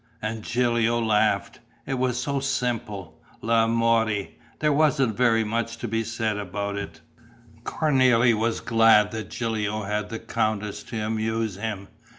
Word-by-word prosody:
And 110 +1 -4
Gilio 120 0 +1
laughed. 110 -2 +1 0.3
It 135 -1 -2
was 125 -1 0
so 140 +2 -1
simple, 120 -8 -3 0.2
l'amore; 115 -2 +2 0.3
there 150 -1 +2
wasn't 140 -6 +2
very 115 -2 +3
much 115 +2 -2
to 120 - -5
be 115 +1 -1
said 110 -2 -2
about 100 +1 -4
it. 90 -5 -6 0.6
Cornélie 130 -6 +3
was 115 +1 -1
glad 115 -2 +4
that 110 -3 -5
Gilio 110 -2 -2
had 105 +1 -2
the 115 - -4
countess 110 -2 -2
to 110 - -5
amuse 110 -1 -2
him. 105 -2 -4
115 Hz, 140 wpm, -25 LUFS, 105-120 Hz, 0.6 s, glad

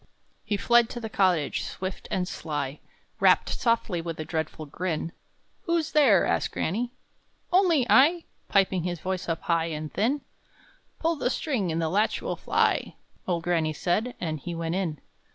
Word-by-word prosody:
He 205 - -1
fled 240 +2 +4
to 240 - -5
the 220 -2 -6
cottage, 180 -8 +2
swift 190 0 -5
and 180 -1 -1
sly; 145 -4 -4 0.4
Rapped - - +4
softly, 230 -7 0
with 165 -1 -5
a 155 - -3
dreadful 155 -1 -3
grin. 165 +1 -3 0.5
"Who's 335 -2 0
there?" 255 - +5
asked - - 0
granny. 235 +8 -1 0.6
"Only 350 -8 +4
I!" 325 +8 +5 0.3
Piping 190 -2 +3
his 175 0 -3
voice 185 +1 -3
up 165 - -1
high 165 -1 +1
and 155 -1 -5
thin. 265 +7 +1 0.8
"Pull 330 0 0
the 250 - 0
string, 245 - -1
and 160 - -1
the 165 - +1
latch 205 +7 +1
will - - -3
fly!" - - +1 0.3
Old 170 -2 0
granny 165 -3 +1
said; 205 +10 -1
and 155 -3 -3
he 170 +4 -5
went 165 0 -2
in. 175 -6 -2
185 Hz, 165 wpm, -27 LUFS, 165-235 Hz, 0.8 s, there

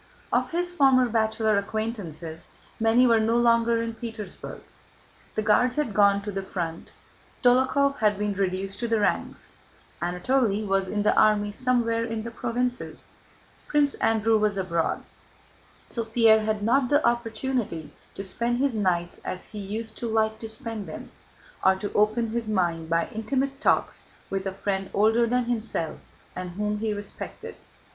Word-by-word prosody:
Of - - +2
his 350 +1 -1
former 265 -5 +5
bachelor 220 -2 +2
acquaintances 200 -7 -5 0.3
many 225 +3 +4
were 230 -2 +5
no 225 +2 +2
longer 230 -1 +3
in 230 0 -3
Petersburg. 225 -2 -8 0.7
The 215 - 0
Guards 240 +4 +3
had 300 -8 -1
gone 200 0 +4
to 205 - -4
the 195 0 -3
front; 170 -4 -5 0.5
Dólokhov 265 +3 +3
had 210 -2 +3
been 205 0 -1
reduced 195 0 -2
to 235 - -1
the 225 -1 +1
ranks; 205 - -1 0.5
Anatole 210 +5 +1
was 195 -1 +1
in 205 +2 -1
the 210 - +3
army 210 -1 +4
somewhere 230 0 +1
in 225 -1 -3
the 235 - -6
provinces; 245 +1 -3 0.6
Prince 290 -1 +2
Andrew 225 0 +2
was 210 -1 +1
abroad; 170 -4 -1 0.8
so 230 - -3
Pierre 225 -1 +4
had 215 -1 -1
not 250 +3 +3
the 290 +1 +3
opportunity 230 - -1 0.2
to 195 - -5
spend 235 +5 -1
his 270 -2 +1
nights 175 -4 0
as 180 - -5
he 210 - -5
used 215 +3 -5
to 235 - -3
like 220 -1 +1
to 225 - -6
spend 225 -3 -5
them, - - -8 0.5
or 190 0 +5
to 200 +2 -5
open 215 +2 +2
his 230 -1 -2
mind 170 -5 0
by 165 0 +1
intimate 270 +5 -2
talks - - +1 0.3
with 195 0 -2
a - - -1
friend 195 0 -2
older 225 +3 +4
than 250 +1 +1
himself 220 -9 -2 0.4
and 180 0 -4
whom 210 +2 -2
he 220 0 -1
respected. 205 0 -7
220 Hz, 160 wpm, -26 LUFS, 200-235 Hz, 0.8 s, former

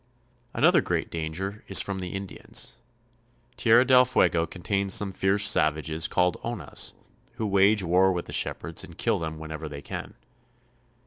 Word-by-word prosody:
Another - - +4
great - - -2
danger 85 +6 -5
is 95 - +6
from 100 -1 -2
the 90 -1 -5
Indians. 95 -1 -3 0.8
Tierra 120 +2 +4
del 125 -1 +6
Fuego 85 -9 +1
contains 95 +3 0
some 100 -2 +1
fierce 100 +2 +1
savages 80 -2 +1
called 90 0 0
Onas, 120 -2 -2 0.4
who 115 -2 -4
wage 100 +1 +3
war 90 +2 +3
with 90 -2 -3
the - - -9
shepherds - - -2
and - - -12
kill - - 0
them 80 -1 -5
whenever 80 0 -7
they 70 -1 -9
can. - - -7
95 Hz, 150 wpm, -26 LUFS, 80-100 Hz, 0.8 s, is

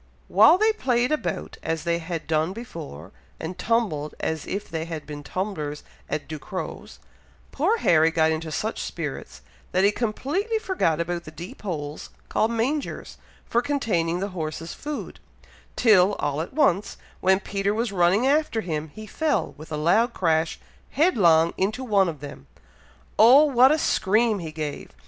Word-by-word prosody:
While 220 - +7
they 435 +2 +3
played 250 - +1
about, 305 - -3
as 160 -1 -2
they 170 0 0
had 165 -1 -5
done 160 +2 0
before, 155 - -9 0.3
and 165 +3 -5
tumbled 180 -9 -1
as 160 -2 -3
if 200 +1 -4
they 160 -1 -4
had 165 -3 -6
been 145 -1 -7
tumblers 150 -2 -4 0.3
at 150 - -3
Ducrow's, 160 +4 -7 0.5
poor 375 +11 +1
Harry 160 - +4
got 160 -1 +2
into 160 0 -3
such 215 +8 -2
spirits, - - -6 0.3
that 185 - +3
he 200 - +5
completely 290 - -1
forgot 370 - 0
about 170 0 -3
the - - -8
deep 170 +4 -10
holes 150 -7 -5 0.2
called 220 - +1
mangers, 250 +6 -2 0.3
for 235 - +1
containing 190 -12 0
the 200 - -2
horse's 165 -2 -5
food, 295 0 -6 0.6
till 205 -4 +5
all 145 +1 -2
at 165 - -6
once, 205 - +1 0.2
when 190 0 +3
Peter 195 0 -1
was 225 +1 -1
running 190 +5 +3
after 280 -5 +2
him, 155 -4 -3
he 215 - -8
fell, 310 +7 -1
with 155 +2 -12
a 150 - -2
loud 220 +10 +2
crash, 160 -2 +1 0.3
headlong 175 - +4
into 215 +7 -1
one 200 -6 +3
of 155 -4 -7
them! 140 - -9 0.7
Oh! 250 +7 +8
what 260 -2 +5
a 310 - +3
scream 220 -5 +2
he 165 -3 -6
gave! 155 -2 -5
185 Hz, 160 wpm, -24 LUFS, 160-235 Hz, 0.7 s, Oh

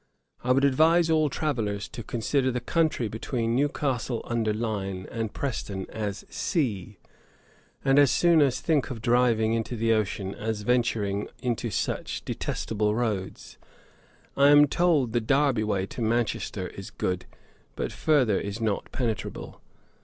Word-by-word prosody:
'I 125 +1 +3
would 135 +2 +3
advise 160 +5 +4
all 155 -2 +3
travellers 110 -9 -2
to 120 - -7
consider 130 +4 0
the 125 -1 -1
country 155 -2 0
between 115 +2 -2
Newcastle 135 -4 -1
under 115 -2 0
Line 100 -4 -3
and 115 -2 -3
Preston 100 -8 -4
as 105 -3 -4
sea, 110 - -2 0.9
and 135 +1 +5
as 145 -2 +6
soon 160 -1 +4
think 140 +2 0
of 125 -4 -5
driving 115 -1 +2
into 115 +1 -2
the 115 0 +2
ocean 100 -2 -1
as 110 -1 -4
venturing 105 -4 0 0.2
into 120 -3 -1
such - - -3
detestable 105 -1 -2
roads. 105 -6 -3 0.8
I 140 0 +5
am 145 0 +8
told 145 -6 +2
the 120 - +2
Derby 135 0 +2
way 100 -3 0
to 120 - -8
Manchester 110 -4 -1
is 95 - -9
good, 90 0 -3 0.5
but - - -3
further 130 -10 +2
is 100 +2 -5
not 110 -3 -2
penetrable.' 115 -4 -4
115 Hz, 140 wpm, -26 LUFS, 105-135 Hz, 0.9 s, am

